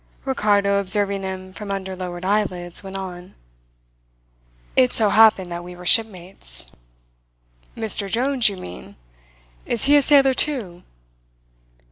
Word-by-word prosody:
Ricardo, 205 Hz, -6 st, +1 dB
observing 200 Hz, 0 st, +2 dB
him 185 Hz, -1 st, -7 dB
from 210 Hz, 0 st, -9 dB
under 190 Hz, -1 st, -4 dB
lowered 180 Hz, -1 st, -7 dB
eyelids, 185 Hz, -4 st, -2 dB
went 195 Hz, 0 st, -9 dB
on: 180 Hz, -2 st, -8 dB, 1.4 s
"It 255 Hz, -1 st, +3 dB
so 215 Hz, -2 st, +3 dB
happened 205 Hz, -4 st, +4 dB
that 170 Hz, 0 st, -6 dB
we 180 Hz, 0 st, -10 dB
were 180 Hz, 0 st, -12 dB
shipmates." 185 Hz, -, +1 dB, 1.1 s
"Mr 215 Hz, -3 st, 0 dB
Jones, 250 Hz, -1 st, +2 dB
you 200 Hz, -, -8 dB
mean? 90 Hz, -, -11 dB, 0.7 s
Is 235 Hz, -, 0 dB
he 285 Hz, +1 st, +5 dB
a 290 Hz, -, +6 dB
sailor 275 Hz, -2 st, +4 dB
too?" 230 Hz, -12 st, -1 dB
195 Hz, 125 wpm, -21 LUFS, 180-225 Hz, 1.4 s, a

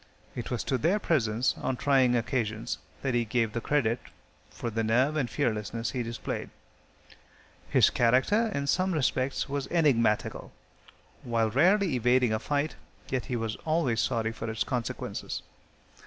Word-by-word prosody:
It 120 Hz, -, -5 dB
was 120 Hz, -3 st, -2 dB
to 130 Hz, -, -1 dB
their 175 Hz, -, +2 dB
presence 125 Hz, -, +1 dB
on 130 Hz, -, -1 dB
trying 130 Hz, -3 st, +3 dB
occasions 115 Hz, -2 st, -1 dB, 0.2 s
that 135 Hz, -2 st, 0 dB
he 120 Hz, -1 st, +2 dB
gave 115 Hz, -1 st, 0 dB
the 120 Hz, -, -2 dB
credit 120 Hz, -3 st, +1 dB, 0.5 s
for 115 Hz, +9 st, -5 dB
the 115 Hz, +1 st, -1 dB
nerve 125 Hz, +7 st, +2 dB
and 135 Hz, -6 st, 0 dB
fearlessness 115 Hz, -3 st, -1 dB
he 125 Hz, -, -2 dB
displayed. 115 Hz, -1 st, -4 dB, 1.2 s
His -, -, +5 dB
character, 130 Hz, -, +3 dB
in 140 Hz, -6 st, -2 dB
some 185 Hz, +6 st, +1 dB
respects, 135 Hz, -3 st, 0 dB
was 140 Hz, -1 st, -3 dB
enigmatical. 130 Hz, -10 st, +1 dB, 0.7 s
While 115 Hz, -2 st, 0 dB
rarely 185 Hz, -, +4 dB
evading 125 Hz, -1 st, +3 dB
a 110 Hz, -, 0 dB
fight, 145 Hz, +5 st, -1 dB, 0.3 s
yet 130 Hz, -2 st, -1 dB
he 125 Hz, -, -3 dB
was 115 Hz, -2 st, -2 dB
always 155 Hz, -8 st, 0 dB
sorry 115 Hz, -2 st, 0 dB
for 115 Hz, 0 st, -5 dB
its 110 Hz, 0 st, -1 dB
consequences. 125 Hz, -3 st, -4 dB
125 Hz, 150 wpm, -28 LUFS, 115-140 Hz, 1.2 s, His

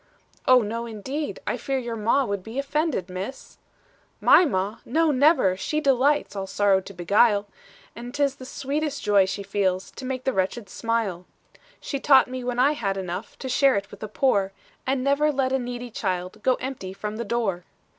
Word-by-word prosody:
'Oh, 255 Hz, -2 st, +6 dB
no, 230 Hz, +3 st, -4 dB
indeed 265 Hz, +8 st, -4 dB
I -, -, -1 dB
fear 270 Hz, -1 st, -2 dB
your 240 Hz, -3 st, -4 dB
ma 230 Hz, +5 st, +2 dB
Would 200 Hz, -3 st, -3 dB
be 225 Hz, +6 st, -9 dB
offended, 280 Hz, -, -1 dB
Miss.' 190 Hz, +8 st, -7 dB, 0.6 s
"'My 360 Hz, -, +6 dB
ma! 200 Hz, -, -1 dB
no, 320 Hz, +5 st, +2 dB
never; 265 Hz, -, +4 dB
she 300 Hz, +10 st, -2 dB
delights 280 Hz, -2 st, +2 dB
All 195 Hz, -1 st, -4 dB
sorrow 195 Hz, -1 st, +2 dB
to 195 Hz, -, -11 dB
beguile; 205 Hz, +4 st, +3 dB, 0.5 s
And 240 Hz, +2 st, -7 dB
't 285 Hz, +2 st, 0 dB
is 275 Hz, -1 st, +1 dB
the 255 Hz, -, -10 dB
sweetest 285 Hz, +2 st, -3 dB
joy 200 Hz, -2 st, +4 dB
she 200 Hz, +1 st, -4 dB
feels, 195 Hz, -2 st, -1 dB
To -, -, -10 dB
make 255 Hz, 0 st, -3 dB
the 265 Hz, -, 0 dB
wretched 195 Hz, +3 st, -2 dB
smile. 215 Hz, -5 st, -2 dB, 0.5 s
"'She 275 Hz, -, -4 dB
taught 270 Hz, -1 st, +6 dB
me 255 Hz, 0 st, -5 dB
when 245 Hz, 0 st, -2 dB
I 265 Hz, +4 st, +4 dB
had 195 Hz, -10 st, -2 dB
enough, 180 Hz, -2 st, -5 dB
To 265 Hz, -, -6 dB
share 270 Hz, +1 st, +3 dB
it 200 Hz, 0 st, -3 dB
with 205 Hz, -, -11 dB
the 215 Hz, -, -5 dB
poor; 200 Hz, -4 st, +1 dB, 0.3 s
And 260 Hz, -1 st, 0 dB
never 280 Hz, +2 st, +3 dB
let 265 Hz, -2 st, 0 dB
a 265 Hz, -, +2 dB
needy 245 Hz, -1 st, -5 dB
child, 185 Hz, 0 st, -3 dB
Go 255 Hz, +2 st, +3 dB
empty 250 Hz, -8 st, -6 dB
from 210 Hz, +2 st, -5 dB
the 235 Hz, -, -2 dB
door. 205 Hz, -6 st, -1 dB
235 Hz, 195 wpm, -25 LUFS, 200-270 Hz, 0.6 s, Oh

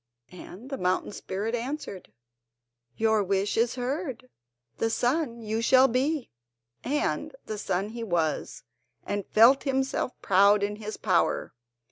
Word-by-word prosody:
And 195 Hz, +7 st, -11 dB
the 270 Hz, -, -3 dB
mountain 185 Hz, +2 st, 0 dB
spirit 205 Hz, +3 st, -4 dB
answered: 240 Hz, -, -5 dB, 0.9 s
"Your 220 Hz, -1 st, +3 dB
wish 195 Hz, +1 st, 0 dB
is 230 Hz, +2 st, +1 dB
heard; 255 Hz, -1 st, -4 dB, 0.5 s
the 225 Hz, -, +1 dB
sun 240 Hz, 0 st, 0 dB
you 220 Hz, +1 st, -2 dB
shall 260 Hz, +3 st, +6 dB
be." 265 Hz, +3 st, -1 dB, 0.5 s
And 295 Hz, -, -1 dB
the 215 Hz, -1 st, -5 dB
sun 195 Hz, +1 st, -1 dB
he 230 Hz, +1 st, -6 dB
was, 170 Hz, -7 st, -1 dB, 0.4 s
and 205 Hz, -1 st, -3 dB
felt 235 Hz, +5 st, +6 dB
himself 265 Hz, -2 st, -1 dB
proud 200 Hz, +2 st, +4 dB
in 205 Hz, +1 st, -2 dB
his 215 Hz, 0 st, -6 dB
power. -, -, +1 dB
225 Hz, 130 wpm, -27 LUFS, 200-260 Hz, 0.9 s, shall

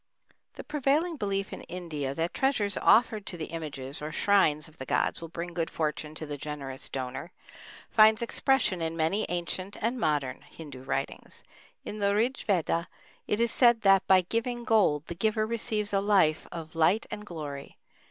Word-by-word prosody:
The -, -, -8 dB
prevailing 300 Hz, +4 st, +1 dB
belief 195 Hz, -3 st, -2 dB
in -, -, -7 dB
India, 155 Hz, -6 st, -4 dB
that 165 Hz, +3 st, -1 dB
treasures 245 Hz, -7 st, +1 dB
offered 225 Hz, -2 st, +4 dB
to 175 Hz, -, -5 dB
the 160 Hz, -, -6 dB
images 145 Hz, -4 st, -6 dB
or 150 Hz, +1 st, -4 dB
shrines 155 Hz, -6 st, +3 dB
of 155 Hz, -, -20 dB
the 130 Hz, -, -5 dB
gods -, -, 0 dB
will 165 Hz, -, -6 dB
bring 170 Hz, +1 st, -6 dB
good 165 Hz, -1 st, -1 dB
fortune 155 Hz, -1 st, -3 dB
to 155 Hz, -, -6 dB
the 145 Hz, -1 st, -5 dB
generous 140 Hz, -3 st, -5 dB
donor, 130 Hz, +6 st, -5 dB, 0.6 s
finds 220 Hz, +1 st, +6 dB
expression 235 Hz, -7 st, +1 dB
in 165 Hz, 0 st, -2 dB
many 170 Hz, +7 st, +1 dB
ancient 180 Hz, +3 st, -3 dB
and 235 Hz, +3 st, -1 dB
modern 145 Hz, -, 0 dB
Hindu 140 Hz, -5 st, -11 dB
writings. 135 Hz, +1 st, -4 dB, 0.4 s
In 215 Hz, -, -6 dB
the 200 Hz, 0 st, +2 dB
Rig 240 Hz, +5 st, +1 dB
Veda 170 Hz, -3 st, 0 dB, 0.4 s
it 210 Hz, -, 0 dB
is 235 Hz, 0 st, +2 dB
said 240 Hz, -3 st, +5 dB
that 195 Hz, -2 st, +5 dB
"by 190 Hz, -1 st, +6 dB
giving 235 Hz, +6 st, -2 dB
gold 200 Hz, -, +3 dB
the 170 Hz, -, -5 dB
giver 215 Hz, +4 st, +1 dB
receives 215 Hz, -2 st, -2 dB
a 195 Hz, -, +3 dB
life 190 Hz, -7 st, +3 dB
of 160 Hz, -2 st, -7 dB
light 170 Hz, +7 st, +3 dB
and 210 Hz, -, -5 dB
glory." 150 Hz, -7 st, -7 dB
180 Hz, 175 wpm, -28 LUFS, 155-215 Hz, 0.6 s, finds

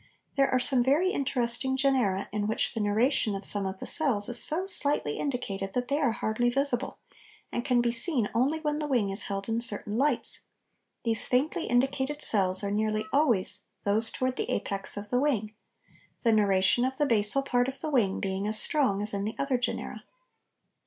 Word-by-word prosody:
There 275 Hz, -1 st, +1 dB
are 255 Hz, -, 0 dB
some 250 Hz, -1 st, +2 dB
very 305 Hz, +9 st, +1 dB
interesting 265 Hz, -2 st, -1 dB
genera 255 Hz, -9 st, -1 dB
in 205 Hz, 0 st, -3 dB
which 220 Hz, -, -2 dB
the -, -, -5 dB
neuration 215 Hz, +1 st, 0 dB
of 195 Hz, -, -6 dB
some 200 Hz, -2 st, -2 dB
of 190 Hz, 0 st, -7 dB
the -, -, -9 dB
cells 250 Hz, -10 st, +1 dB
is 240 Hz, 0 st, +11 dB
so 345 Hz, +5 st, +3 dB
slightly 290 Hz, -, +4 dB
indicated 200 Hz, -8 st, -5 dB
that 250 Hz, 0 st, -4 dB
they 285 Hz, +1 st, 0 dB
are 270 Hz, -6 st, 0 dB
hardly 225 Hz, +2 st, -2 dB
visible, 270 Hz, 0 st, -1 dB, 0.5 s
and 240 Hz, -, -4 dB
can 245 Hz, -1 st, 0 dB
be 240 Hz, 0 st, -1 dB
seen 240 Hz, -, +1 dB
only 275 Hz, +7 st, -1 dB
when 300 Hz, -1 st, -3 dB
the 300 Hz, -, -4 dB
wing 235 Hz, -8 st, -1 dB
is 195 Hz, +2 st, -1 dB
held 195 Hz, -1 st, -6 dB
in 225 Hz, +1 st, -3 dB
certain 210 Hz, -2 st, +1 dB
lights; 270 Hz, +1 st, 0 dB, 0.6 s
these 225 Hz, -1 st, +2 dB
faintly 300 Hz, +7 st, -2 dB
indicated 270 Hz, +4 st, -1 dB
cells 190 Hz, -2 st, +3 dB
are 200 Hz, -, -3 dB
nearly 215 Hz, +1 st, -2 dB
always 235 Hz, -9 st, +2 dB, 0.2 s
those 215 Hz, +3 st, +5 dB
towards 255 Hz, 0 st, -4 dB
the -, -, -4 dB
apex 195 Hz, 0 st, -2 dB
of 205 Hz, 0 st, -9 dB
the 245 Hz, -, 0 dB
wing, 225 Hz, -7 st, -2 dB, 0.7 s
the 230 Hz, -, +2 dB
neuration 200 Hz, +1 st, +1 dB
of 260 Hz, +1 st, -3 dB
the 295 Hz, -, 0 dB
basal 225 Hz, +2 st, +3 dB
part 245 Hz, -2 st, -1 dB
of 265 Hz, 0 st, -7 dB
the 310 Hz, -, -5 dB
wing 215 Hz, -8 st, 0 dB
being 195 Hz, +1 st, -4 dB
as 215 Hz, 0 st, +2 dB
strong 230 Hz, -10 st, +1 dB
as 210 Hz, -, -2 dB
in 200 Hz, 0 st, -4 dB
the 215 Hz, +2 st, -5 dB
other 275 Hz, -3 st, -2 dB
genera. 250 Hz, -, -5 dB
240 Hz, 195 wpm, -26 LUFS, 205-270 Hz, 0.7 s, is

